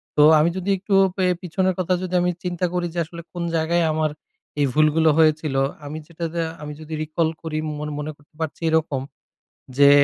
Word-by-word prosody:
তো 150 - +6 0.2
আমি 160 +3 +4
যদি 190 +2 -3
একটু 195 +1 -1 0.2
পে 185 - +2 0.2
পিছনের 185 +1 0
কথা 185 0 +1
যদি 185 0 -5
আমি 180 0 +2
চিন্তা 180 0 -1
করি 175 -1 0
যে 175 - -2
আসলে 170 +1 -9
কোন 175 -1 -3
জায়গায় 165 +1 +2
আমার 155 -1 0 0.5
এই 145 - +4
ভুলগুলো 155 +1 +4
হয়েছিল 155 -3 +3 0.3
আমি 150 +2 -5
যেটা 170 0 -5
দা 170 -1 0 0.2
আমি 150 0 -6
যদি 155 +1 -8
রিকল 160 +1 0
করি 160 -2 -4 0.2
ম - - -7 0.2
মনে 150 +1 -3
করতে 145 +1 -27
পারছি 160 +1 -4
এরকম, 160 -4 +1 0.8
যে 140 0 +8
160 Hz, 190 wpm, -23 LUFS, 155-175 Hz, 0.8 s, যে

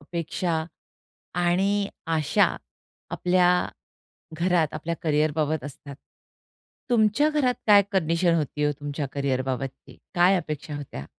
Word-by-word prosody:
अपेक्षा 165 +1 -2 0.8
आणि 195 +3 +2 0.2
आशा 160 -2 +3 0.6
आपल्या 180 0 +2 0.9
घरात 170 -2 +1
आपल्या 165 +2 -3
करियरबाबत 155 0 +1
असतात. 140 0 -9 0.9
तुमच्या 230 +5 +3
घरात 265 -5 +2
काय 205 -2 +7
कंडिशन 170 -1 +2
होती 150 -2 -1
हो, 150 - +2
तुमच्या 145 0 -3
करियर 135 -2 0
बाबतची? 135 0 -5 0.2
काय 180 +2 +5
अपेक्षा 155 -3 -4
होत्या? 95 - -7
160 Hz, 105 wpm, -25 LUFS, 145-185 Hz, 0.9 s, काय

